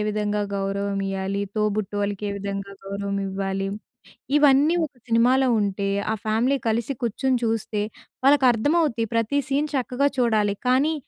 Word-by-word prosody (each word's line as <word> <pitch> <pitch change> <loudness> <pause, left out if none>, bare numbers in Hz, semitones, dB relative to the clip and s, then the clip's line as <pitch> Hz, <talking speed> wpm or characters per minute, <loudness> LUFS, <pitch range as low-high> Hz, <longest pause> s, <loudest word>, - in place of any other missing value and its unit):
విధంగా 210 0 -1
గౌరవమియ్యాలి, 195 0 -2
తోబుట్టు 210 -1 -1
వాళ్ళకి 205 0 -2
ఏ - - -2
విధంగా 200 0 -5
గౌరవం 200 0 -3
ఇవ్వాలి. 195 0 -2 0.7
ఇవన్నీ 290 +3 +5
ఒక 295 - -12
సినిమాలో 245 +3 +4
ఉంటే, 200 0 -1 0.2
ఆ - - +1
ఫ్యామిలీ 230 +6 +2
కలిసి 230 +4 0
కూర్చొని 250 +3 +1
చూస్తే, 225 -2 -1 0.4
వాళ్ళకి 280 -1 +5
అర్థమవుద్ది 260 0 +1
ప్రతి 230 +5 +1
సీన్ 290 +2 +1
చక్కగా 260 +1 +1
చూడాలి. 215 -4 +2
కానీ 270 +5 +3
215 Hz, 130 wpm, -24 LUFS, 200-260 Hz, 0.7 s, ఇవన్నీ